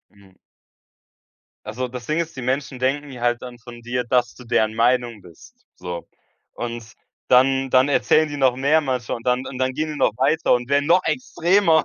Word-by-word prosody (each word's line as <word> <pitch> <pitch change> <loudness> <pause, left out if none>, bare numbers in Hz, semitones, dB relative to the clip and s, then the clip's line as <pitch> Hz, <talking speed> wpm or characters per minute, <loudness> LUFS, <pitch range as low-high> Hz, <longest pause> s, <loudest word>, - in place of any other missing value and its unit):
Mhm. 100 -1 -20 1.3
Ach 105 0 -7
so, 130 +1 -2
das 125 -1 -9
Ding 155 +2 0
ist, 165 -1 -3
die 130 - -6
Menschen 130 +1 -2
denken 140 +3 -1
ja 125 -2 -10
halt 120 0 +1
dann 125 -1 -9
von 120 0 -12
dir, 125 +1 -2
dass 120 -1 +1
du 125 - -14
deren 110 -1 +1
Meinung 120 -1 +1
bist, 85 -3 -16 0.2
so. 90 -1 -7 0.5
Und 115 -2 -6 0.3
dann 135 +1 +3
dann 130 +1 +4
erzählen 155 +2 +3
die 145 - -6
noch 130 -2 +3
mehr 140 +5 +3
manchmal, 125 -6 -3
und 115 - -11
dann 125 +1 +1
und 130 - -7
dann 130 0 +1
gehen 155 +3 -2
die - - -6
noch - - +3
weiter 150 +5 +2
und 125 +1 -1
werden 140 +1 +2
noch 180 +2 +4
extremer. 180 -8 +2
130 Hz, 205 wpm, -22 LUFS, 120-145 Hz, 1.3 s, dann